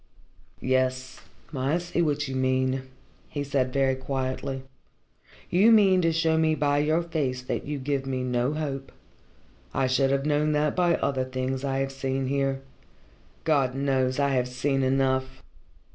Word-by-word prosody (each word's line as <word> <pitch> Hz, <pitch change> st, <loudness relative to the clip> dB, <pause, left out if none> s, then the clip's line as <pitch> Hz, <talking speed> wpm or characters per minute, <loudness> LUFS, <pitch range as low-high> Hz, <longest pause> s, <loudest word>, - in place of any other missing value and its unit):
"Yes, 130 Hz, 0 st, -1 dB, 0.3 s
I 135 Hz, +5 st, +1 dB
see 175 Hz, 0 st, -2 dB
what 150 Hz, -3 st, 0 dB
you 135 Hz, -, -4 dB
mean," 130 Hz, 0 st, 0 dB, 0.4 s
he 145 Hz, -, -3 dB
said, 135 Hz, -2 st, 0 dB
very 135 Hz, 0 st, +2 dB
quietly. 130 Hz, 0 st, -3 dB, 0.9 s
"You 200 Hz, +6 st, +5 dB
mean 195 Hz, -4 st, +5 dB
to 165 Hz, -1 st, +2 dB
show 160 Hz, 0 st, +2 dB
me 160 Hz, -1 st, +3 dB
by 145 Hz, -1 st, +1 dB
your 155 Hz, +3 st, +2 dB
face 140 Hz, -7 st, -2 dB
that 125 Hz, -, -4 dB
you 150 Hz, 0 st, -2 dB
give 135 Hz, 0 st, -2 dB
me 130 Hz, -1 st, -2 dB
no 125 Hz, +3 st, 0 dB
hope. 135 Hz, -3 st, -4 dB, 0.8 s
I -, -, +2 dB
should 130 Hz, +1 st, +2 dB
have 135 Hz, +1 st, 0 dB
known 150 Hz, 0 st, +2 dB
that 150 Hz, 0 st, +1 dB
by 175 Hz, -2 st, +3 dB
other 130 Hz, -2 st, 0 dB
things 130 Hz, +1 st, -3 dB
I 135 Hz, -1 st, -1 dB
have 135 Hz, 0 st, -1 dB
seen 135 Hz, 0 st, -2 dB
here. 135 Hz, 0 st, 0 dB, 0.8 s
God 140 Hz, -5 st, +2 dB
knows, 130 Hz, -2 st, +1 dB
I 140 Hz, 0 st, +2 dB
have 125 Hz, -2 st, +1 dB
seen 135 Hz, +2 st, -1 dB
enough! 130 Hz, 0 st, 0 dB
135 Hz, 160 wpm, -26 LUFS, 130-150 Hz, 0.9 s, You